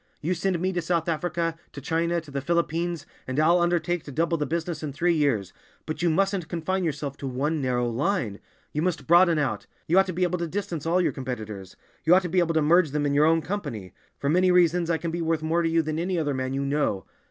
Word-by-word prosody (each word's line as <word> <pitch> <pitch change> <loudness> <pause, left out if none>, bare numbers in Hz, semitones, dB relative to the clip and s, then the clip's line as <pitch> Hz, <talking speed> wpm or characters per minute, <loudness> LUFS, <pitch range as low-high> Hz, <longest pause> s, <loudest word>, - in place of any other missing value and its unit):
You 170 +5 -1
send 185 -1 -1
me 185 +2 -1
to 175 - -1
South 165 0 0
Africa—to 165 -2 -3
China—to 165 +2 -1
the 140 0 -3
Philippines, 170 0 -1 0.2
and 130 +3 -1
I'll 170 +3 +4
undertake 175 -1 0
to 145 - -8
double 165 +4 +1
the 150 -2 -2
business 165 -1 -3
in 150 -3 -4
three 175 +4 +2
years, 130 - 0 0.3
but 155 - -4
you 175 - +3
mustn't 195 +1 +1
confine 185 +3 -1
yourself 145 -3 -3
to 140 - -5
one 145 +4 -1
narrow 125 -2 0
line; 120 - -1 0.3
you 150 - -1
must 180 -1 -1
broaden 170 0 +5
out. 125 -8 -1 0.2
You 175 +4 +4
ought 195 - +3
to 185 - -3
be 180 +2 0
able 180 0 0
to 170 - -2
distance 175 -3 -4
all 180 +2 +3
your - - +1
competitors; 110 -8 -6 0.3
you 170 +3 +6
ought 190 - +4
to 180 - -3
be 185 +2 +2
able 165 -2 +1
to 160 - +3
merge 170 +2 +4
them 145 +1 -1
in 140 - +1
your 145 +2 +4
own 165 0 +3
company. 140 - -5 0.2
For 140 - -3
many 180 +5 +3
reasons 175 -1 +3
I 165 - +2
can 165 0 -4
be 170 +1 -3
worth 160 -1 0
more 165 +2 +1
to 165 - +1
you 165 0 +2
than 155 +1 -2
any 180 +1 -1
other 150 -3 0
man 130 0 -2
you 140 0 -1
know. 140 -9 0
165 Hz, 245 wpm, -26 LUFS, 145-175 Hz, 0.3 s, you